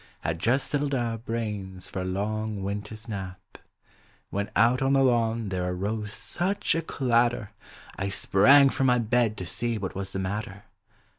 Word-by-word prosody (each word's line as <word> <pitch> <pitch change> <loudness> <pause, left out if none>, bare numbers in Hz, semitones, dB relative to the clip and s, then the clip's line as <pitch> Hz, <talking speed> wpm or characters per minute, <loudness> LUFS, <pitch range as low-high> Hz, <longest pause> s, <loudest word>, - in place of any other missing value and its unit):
Had 80 +1 -2
just 120 +9 +2
settled 145 -1 0
our 115 -3 -1
brains 105 -5 -4
for 95 - -3
a - - -3
long 105 +2 -2
winter's 105 +3 -5
nap 95 -3 -7 0.7
When 100 +1 -2
out 120 +3 +4
on 135 +1 +2
the 135 0 +4
lawn 115 -3 +1
there 90 -1 -1
arose 105 +3 -3
such 175 - -1
a 165 - 0
clatter. 120 -7 +1 0.5
I 100 0 -1
sprang 135 +9 +5
from 135 0 +1
my 125 -1 +4
bed 115 -1 +1
to 90 - -5
see 115 +5 -2
wnat 95 -3 -4
was 95 0 -4
the - - -2
mat 100 +3 -2
ter. 100 +1 -12
110 Hz, 170 wpm, -27 LUFS, 95-120 Hz, 0.7 s, sprang